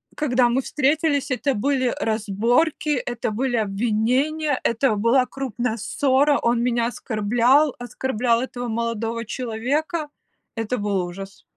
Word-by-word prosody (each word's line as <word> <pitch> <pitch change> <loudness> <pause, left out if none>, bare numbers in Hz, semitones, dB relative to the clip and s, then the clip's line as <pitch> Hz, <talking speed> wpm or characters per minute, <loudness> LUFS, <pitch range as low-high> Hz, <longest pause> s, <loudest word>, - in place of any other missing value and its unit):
Когда 250 -4 +2
мы 250 +3 +1
встретились, 290 +1 +1
это 270 +2 0
были 260 +2 +1
разборки, 225 +9 0
это 240 -3 -3
были 245 +3 -1
обвинения, 240 +8 0
это 235 0 +1
была 230 +5 +3
крупная 250 -4 -3
ссора, 275 +5 +2
он 235 0 +1
меня 240 -1 +1
оскорблял, 245 +5 +2
оскорблял 245 -1 0
этого 245 -1 -5
молодого 230 0 -2
человека. 265 +8 -2 0.5
Это 225 +2 -2
был 200 -4 -1
ужас. 195 +3 -9
245 Hz, 120 wpm, -22 LUFS, 225-270 Hz, 0.5 s, была